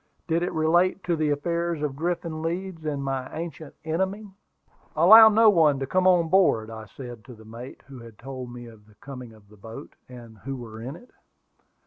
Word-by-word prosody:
Did 165 0 +1
it 175 - -1
relate 175 +4 +2
to 175 - 0
the 155 -1 0
affairs 170 +2 -2
of 145 -3 -2
Griffin 165 0 -3
Leeds 170 0 -4
and 145 -2 -2
my 135 -1 -3
ancient 160 -2 -7
enemy? 190 +5 -3 0.6
"Allow 220 0 +9
no 220 +1 +5
one 155 -6 +4
to 135 - -3
come 185 +6 +1
on 175 -3 +4
board," 160 - +2
I 110 -1 -9
said 120 -4 -9
to 125 -3 -12
the 110 0 -16
mate, 115 +4 -10
who 135 -2 -12
had 115 -2 -13
told 130 0 -8
me 120 0 -9
of 110 -2 -15
the 105 - -22
coming 125 -1 -10
of 110 -2 -19
the 105 +1 -19
boat, 110 +3 -11 0.2
and 120 -3 -13
who 135 +5 -6
were 110 -3 -9
in 130 +6 -6
it. 245 +8 -16
145 Hz, 200 wpm, -25 LUFS, 120-170 Hz, 0.6 s, Allow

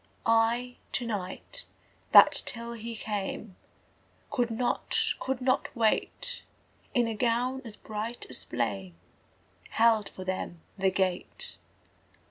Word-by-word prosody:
I, 230 +2 +3 0.2
to 245 - +1
night, 210 - -4 0.5
that - - +9
till 235 -1 -3
he 230 0 -6
came 210 -2 -4 0.8
Could 245 -4 +1
not, 235 +2 0 0.2
could 265 -1 -2
not 255 +1 +2
wait, 235 - 0 0.5
In 240 -2 +4
a 225 - -1
gown 245 +4 +1
as 225 -4 -8
bright 220 +2 -4
as 130 - -4
flame 100 -7 -2 0.7
Held 225 -2 +4
for 185 - -8
them 185 -2 -3
the 195 -1 +3
gate.) 190 - -2
225 Hz, 115 wpm, -29 LUFS, 195-245 Hz, 0.8 s, that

